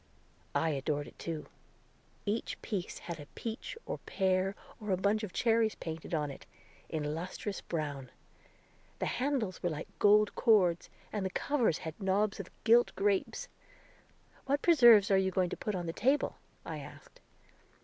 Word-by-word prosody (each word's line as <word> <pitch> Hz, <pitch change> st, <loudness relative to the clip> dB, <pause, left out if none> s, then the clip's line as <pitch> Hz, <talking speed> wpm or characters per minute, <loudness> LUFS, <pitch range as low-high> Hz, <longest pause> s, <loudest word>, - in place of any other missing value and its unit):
I 160 Hz, -, +2 dB
adored 145 Hz, +1 st, -1 dB
it, -, -, -15 dB
too. 165 Hz, -2 st, -4 dB, 0.8 s
Each 215 Hz, +2 st, -2 dB
piece 195 Hz, -5 st, -3 dB
had 170 Hz, -2 st, -6 dB
a 145 Hz, -, -9 dB
peach, 230 Hz, -, -5 dB
or -, -, -4 dB
pear, 190 Hz, 0 st, 0 dB, 0.2 s
or 210 Hz, -2 st, -7 dB
a 185 Hz, -, +2 dB
bunch 205 Hz, +3 st, +2 dB
of 210 Hz, -4 st, -5 dB
cherries 225 Hz, -1 st, +2 dB
painted 160 Hz, -1 st, -6 dB
on 150 Hz, -3 st, 0 dB
it, -, -, -12 dB, 0.4 s
in 150 Hz, -1 st, -2 dB
lustrous 185 Hz, +4 st, -4 dB
brown. 145 Hz, -5 st, -4 dB, 0.9 s
The -, -, -2 dB
handles 250 Hz, -9 st, -1 dB
were 175 Hz, -, +1 dB
like 155 Hz, -1 st, -5 dB
gold 210 Hz, 0 st, +5 dB
cords, 185 Hz, -8 st, +3 dB, 0.2 s
and 210 Hz, -2 st, -1 dB
the 190 Hz, -, 0 dB
covers 240 Hz, -, +1 dB
had 160 Hz, +6 st, -6 dB
knobs 195 Hz, +2 st, +1 dB
of -, -, -6 dB
gilt 235 Hz, +2 st, +5 dB
grapes. 205 Hz, -, 0 dB, 1.0 s
"What 280 Hz, +1 st, +1 dB
preserves 235 Hz, -, +7 dB
are 195 Hz, -, +6 dB
you 190 Hz, 0 st, +2 dB
going 185 Hz, -1 st, 0 dB
to -, -, -2 dB
put 210 Hz, -, -3 dB
on 175 Hz, -1 st, -3 dB
the 165 Hz, -, -3 dB
table?" 270 Hz, +10 st, +1 dB, 0.3 s
I -, -, -5 dB
asked. -, -, -12 dB
195 Hz, 160 wpm, -32 LUFS, 165-220 Hz, 1.0 s, preserves